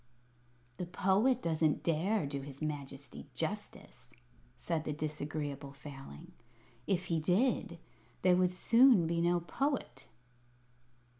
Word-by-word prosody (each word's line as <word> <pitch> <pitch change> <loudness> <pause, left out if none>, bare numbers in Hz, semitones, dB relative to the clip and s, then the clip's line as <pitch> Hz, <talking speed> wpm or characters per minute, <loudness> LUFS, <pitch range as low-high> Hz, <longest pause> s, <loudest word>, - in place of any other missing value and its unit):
"The 180 - -4
Poet 200 +8 +2
doesn't 160 -2 +1
dare 170 +4 +1
do 140 0 -3
his 140 0 -9
Majesty 140 -3 -5
justice," 160 -9 -5 0.4
said 160 +5 -2
the 150 - -3
Disagreeable 145 -2 -4
Failing. 135 - -11 0.6
"If 185 -2 +1
he 165 -2 0
did, 185 +2 +1 0.5
there 180 -1 +6
would 180 0 +3
soon 230 +1 +5
be 170 +1 0
no 175 0 +2
Poet." 250 - -2
165 Hz, 115 wpm, -33 LUFS, 145-185 Hz, 0.6 s, there